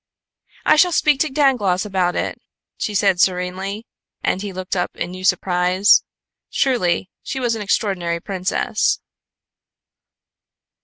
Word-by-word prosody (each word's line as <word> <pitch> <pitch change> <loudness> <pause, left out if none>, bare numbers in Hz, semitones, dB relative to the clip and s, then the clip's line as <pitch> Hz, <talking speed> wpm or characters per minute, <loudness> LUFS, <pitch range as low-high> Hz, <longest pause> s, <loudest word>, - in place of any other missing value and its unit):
"I - - +5
shall 355 +3 +5
speak 300 -3 +3
to 310 - +1
Dangloss 240 -10 +2
about 185 -3 0
it," - - -3 0.3
she 210 - -3
said 190 -2 +3
serenely, 190 +4 -1 0.4
and 190 - 0
he 205 -1 -5
looked 185 0 -4
up 180 - 0
in 175 - -4
new 185 0 -8
surprise. 185 +2 +3 0.5
Truly, 190 -8 +1
she 265 - -4
was 240 -2 0
an 225 - -4
extraordinary 185 -4 -1
princess. 185 +1 -1
190 Hz, 125 wpm, -20 LUFS, 180-220 Hz, 0.5 s, I